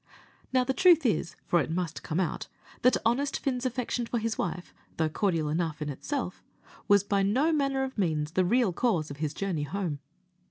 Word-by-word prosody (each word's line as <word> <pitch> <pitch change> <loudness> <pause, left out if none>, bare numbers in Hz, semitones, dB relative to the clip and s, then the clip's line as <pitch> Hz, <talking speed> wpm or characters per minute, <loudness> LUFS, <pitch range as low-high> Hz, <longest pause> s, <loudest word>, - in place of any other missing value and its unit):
Now, 255 -1 +3
the 265 - 0
truth 345 -2 +5
is, 170 -8 0
for 175 - +3
it 140 - -3
must 165 -1 -2
come 160 - -2
out, 180 -4 -2 0.3
that 250 - +5
honest 270 +5 +1
Fin's 255 -2 -1
affection 245 -1 -2
for 240 - -1
his 225 0 -1
wife, 180 -1 -4 0.2
though 160 -1 +1
cordial 165 -3 0
enough 160 0 -1
in 150 -1 -3
itself, 205 - -4 0.4
was 200 -1 +5
by 200 -1 +1
no 255 +12 +2
manner 275 -3 +1
of 265 -4 -5
means 155 -5 0
the 185 +2 +2
real 225 +1 +2
cause 170 - 0
of 140 - -7
his 150 -1 -3
journey 190 -6 -2
home. 160 -1 -3
195 Hz, 195 wpm, -28 LUFS, 160-250 Hz, 0.4 s, truth